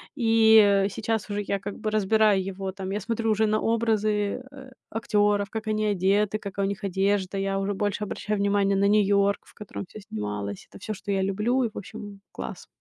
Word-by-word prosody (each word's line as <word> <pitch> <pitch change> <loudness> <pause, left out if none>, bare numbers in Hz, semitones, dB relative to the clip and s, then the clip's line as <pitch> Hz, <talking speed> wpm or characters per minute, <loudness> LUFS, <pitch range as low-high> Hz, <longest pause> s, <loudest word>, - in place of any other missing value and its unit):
И 220 -4 +5
сейчас 220 +1 -2
уже 205 0 -1
я 200 -1 -2
как 205 +1 -6
бы 215 - -2
разбираю 215 -1 +3
его 190 0 -4
там 190 -1 -5
Я 205 - -1
смотрю 225 +1 -1
уже 215 +1 +2
на 215 0 +1
образы, 215 -1 +1
э, 265 -2 -12 0.2
актёров, 205 -2 +1
как 220 +1 -5
они 215 0 0
одеты, 205 +1 +2
какая 200 -1 -3
у 195 - 0
них 200 +1 -5
одежда. 195 0 0
Я 195 0 -1
уже 195 +1 -1
больше 205 +1 -1
обращаю 210 +1 -3
внимание 200 0 +2
на 200 +1 +3
Нью-Йорк, 200 -1 +3
в - - -19
котором 210 -1 -7
всё 215 - -11
снималось. 105 - -5
Это - - -12
всё, 215 +2 -4
что 200 0 -6
я 195 - +1
люблю. 210 +7 +1
И 230 - 0
в - - -10
общем, 205 -1 -8
класс. - - -7
205 Hz, 200 wpm, -26 LUFS, 195-215 Hz, 0.2 s, И